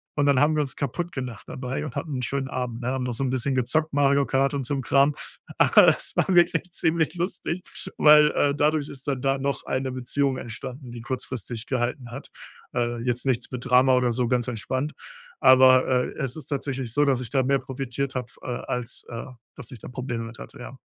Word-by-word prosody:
Und 145 Hz, -, +2 dB
dann 140 Hz, -2 st, +4 dB
haben 155 Hz, +1 st, +3 dB
wir 150 Hz, -, +2 dB
uns 135 Hz, -, -5 dB
kaputtgelacht 135 Hz, -, -4 dB
dabei 130 Hz, +3 st, -4 dB
und 135 Hz, -, -7 dB
hatten 150 Hz, -4 st, -3 dB
'n -, -, -3 dB
schönen 135 Hz, +2 st, -2 dB
Abend, 125 Hz, -2 st, -4 dB
ne? 120 Hz, -, -4 dB
Haben 130 Hz, -1 st, -1 dB
noch 125 Hz, -, -2 dB
so 125 Hz, +4 st, -2 dB
'n 130 Hz, -, 0 dB
bisschen 130 Hz, +1 st, 0 dB
gezockt 155 Hz, +5 st, 0 dB
Mario 140 Hz, 0 st, +3 dB
Kart 135 Hz, +2 st, +1 dB
und 140 Hz, -2 st, -2 dB
so' 145 Hz, -, -2 dB
n 135 Hz, -, -1 dB
Kram. 140 Hz, +3 st, +3 dB, 0.4 s
Aber -, -, +6 dB
das -, -, +2 dB
war -, -, +3 dB
wirklich 175 Hz, +1 st, +3 dB
ziemlich 160 Hz, +1 st, +1 dB
lustig, 175 Hz, 0 st, -3 dB, 0.3 s
weil, 150 Hz, 0 st, +7 dB
äh, 145 Hz, -1 st, +2 dB
dadurch 150 Hz, 0 st, +1 dB
ist 140 Hz, +1 st, -9 dB
dann 135 Hz, -3 st, -1 dB
da 135 Hz, 0 st, +1 dB
noch 140 Hz, +1 st, -2 dB
eine 130 Hz, 0 st, -2 dB
Beziehung 130 Hz, +2 st, 0 dB
entstanden, 125 Hz, +2 st, -7 dB
die 120 Hz, -, -8 dB
kurzfristig 120 Hz, -2 st, -5 dB
gehalten 120 Hz, -1 st, -2 dB
hat. 135 Hz, +3 st, -8 dB, 0.4 s
Äh, 120 Hz, -1 st, 0 dB
jetzt 125 Hz, +1 st, -2 dB
nichts 130 Hz, -4 st, 0 dB
mit 125 Hz, -1 st, -6 dB
Drama 125 Hz, +1 st, +5 dB
oder 125 Hz, -1 st, +2 dB
so, 125 Hz, +1 st, 0 dB
ganz 125 Hz, 0 st, 0 dB
entspannt. 130 Hz, +5 st, -2 dB, 0.5 s
Aber, 130 Hz, 0 st, +7 dB
äh, 125 Hz, -1 st, +1 dB
es 135 Hz, -4 st, -3 dB
ist 155 Hz, -, -8 dB
tatsächlich 135 Hz, -4 st, -3 dB
so, 145 Hz, 0 st, +3 dB
dass 130 Hz, -3 st, +2 dB
ich 120 Hz, -, -4 dB
da 135 Hz, -2 st, +2 dB
mehr 135 Hz, +1 st, +2 dB
profitiert 135 Hz, +1 st, -4 dB
habe, 125 Hz, -2 st, -2 dB
äh, -, -, -14 dB, 0.2 s
als, 125 Hz, -1 st, -4 dB
äh, 115 Hz, -1 st, -6 dB, 0.3 s
dass 125 Hz, -3 st, -10 dB
ich 125 Hz, -, -9 dB
da -, -, -9 dB
Probleme 125 Hz, -2 st, -4 dB
mit 115 Hz, +2 st, -10 dB
hatte, 140 Hz, -, -11 dB
ja. 130 Hz, +2 st, -9 dB
130 Hz, 220 wpm, -25 LUFS, 125-140 Hz, 0.5 s, weil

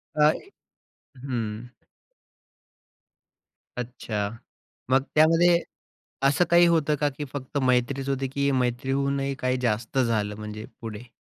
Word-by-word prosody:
काय? 150 Hz, +1 st, +4 dB, 0.8 s
हं. 120 Hz, -3 st, -4 dB, 2.1 s
अच्छा, 115 Hz, -4 st, -3 dB, 0.6 s
मग 130 Hz, +1 st, +4 dB
त्यामध्ये 165 Hz, +3 st, +5 dB, 0.7 s
असं 145 Hz, +6 st, +3 dB
काही 175 Hz, 0 st, +7 dB
होतं 160 Hz, -3 st, +2 dB
का, 145 Hz, 0 st, +1 dB
की 145 Hz, +1 st, -6 dB
फक्त 140 Hz, 0 st, -5 dB
मैत्रीच 130 Hz, +2 st, +1 dB
होती 135 Hz, 0 st, -1 dB
की 140 Hz, +1 st, 0 dB
मैत्रीहूनही 135 Hz, +2 st, 0 dB
काही 130 Hz, 0 st, 0 dB
जास्त 115 Hz, +1 st, 0 dB
झालं 110 Hz, -4 st, +1 dB
म्हणजे 105 Hz, 0 st, -7 dB, 0.2 s
पुढे? 115 Hz, +1 st, -7 dB
130 Hz, 105 wpm, -26 LUFS, 120-140 Hz, 2.1 s, काही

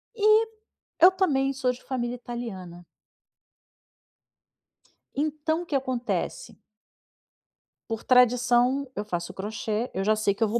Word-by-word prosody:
E, 430 Hz, +1 st, +4 dB, 0.5 s
eu 360 Hz, +2 st, +8 dB
também 275 Hz, -8 st, +1 dB
sou 255 Hz, -1 st, 0 dB
de 250 Hz, -, -11 dB
família 245 Hz, -2 st, -3 dB
italiana. 195 Hz, -8 st, -7 dB, 2.3 s
Então, 310 Hz, +3 st, -1 dB
o -, -, -12 dB
que 295 Hz, -, -3 dB
acontece 260 Hz, -, -3 dB, 1.3 s
por 225 Hz, -1 st, -4 dB
tradição, 250 Hz, +2 st, +3 dB
eu 205 Hz, -, -2 dB
faço 175 Hz, -4 st, -4 dB
o -, -, -19 dB
crochê, 215 Hz, +3 st, -3 dB
eu 190 Hz, -, -2 dB
já 215 Hz, +1 st, +3 dB
sei 210 Hz, -2 st, +1 dB
que 220 Hz, +3 st, -1 dB
eu -, -, +3 dB
vou 235 Hz, +3 st, 0 dB
245 Hz, 130 wpm, -26 LUFS, 215-280 Hz, 2.3 s, eu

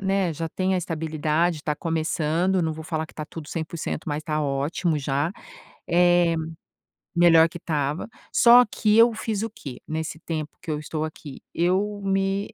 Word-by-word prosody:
né, 195 Hz, -2 st, +1 dB
já 165 Hz, +2 st, -4 dB
tenho 185 Hz, +3 st, 0 dB
a -, -, +2 dB
estabilidade, 160 Hz, 0 st, 0 dB
está 150 Hz, 0 st, -2 dB
começando, 165 Hz, +3 st, 0 dB
não 160 Hz, -1 st, 0 dB
vou 160 Hz, 0 st, -8 dB
falar 160 Hz, 0 st, -2 dB
que -, -, -19 dB
tá 155 Hz, -, -5 dB
tudo 160 Hz, -3 st, -9 dB
100% 160 Hz, -1 st, -4 dB
mas 150 Hz, +1 st, -2 dB
tá 155 Hz, -1 st, -1 dB
ótimo 150 Hz, +4 st, 0 dB
já, 140 Hz, +4 st, -1 dB, 0.6 s
eh, 175 Hz, -1 st, +4 dB, 0.8 s
melhor 165 Hz, -1 st, +6 dB
que 175 Hz, -, -9 dB
estava. 150 Hz, -1 st, -2 dB, 0.3 s
Só 245 Hz, +1 st, +7 dB
que 215 Hz, +1 st, +2 dB
eu 230 Hz, +1 st, +7 dB
fiz 220 Hz, -1 st, -3 dB
o 225 Hz, -, -2 dB
quê, 135 Hz, -, -9 dB
nesse 160 Hz, 0 st, -4 dB
tempo 155 Hz, -2 st, -5 dB
que 180 Hz, -, -9 dB
eu 150 Hz, -, -1 dB
estou 155 Hz, +1 st, -3 dB
aqui. 150 Hz, -3 st, -9 dB
Eu 195 Hz, +4 st, 0 dB
me 195 Hz, +1 st, 0 dB
165 Hz, 170 wpm, -24 LUFS, 155-185 Hz, 0.8 s, Só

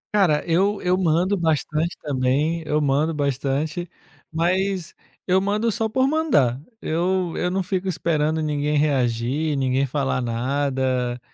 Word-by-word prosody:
Cara, 175 Hz, -8 st, +3 dB
eu 195 Hz, +5 st, +2 dB
eu 180 Hz, 0 st, +3 dB
mando 180 Hz, +2 st, +2 dB
bastante 160 Hz, 0 st, 0 dB
também, 145 Hz, +4 st, 0 dB
eu 150 Hz, -, +1 dB
mando 150 Hz, +3 st, +1 dB
bastante, 145 Hz, +4 st, -1 dB, 0.4 s
mas 180 Hz, +2 st, 0 dB, 0.3 s
eu 185 Hz, +1 st, +3 dB
mando 210 Hz, +3 st, 0 dB
só 225 Hz, 0 st, -1 dB
por 260 Hz, +4 st, +2 dB
mandar. 145 Hz, -, +2 dB, 0.2 s
Eu 180 Hz, -1 st, -1 dB
eu 180 Hz, -, 0 dB
não 190 Hz, +1 st, -1 dB
fico 190 Hz, +1 st, -2 dB
esperando 160 Hz, -2 st, 0 dB
ninguém 150 Hz, -1 st, 0 dB
reagir, 140 Hz, +1 st, 0 dB
ninguém 135 Hz, 0 st, +1 dB
falar 135 Hz, -1 st, -1 dB
nada, 130 Hz, 0 st, -1 dB
155 Hz, 130 wpm, -23 LUFS, 140-185 Hz, 0.4 s, Cara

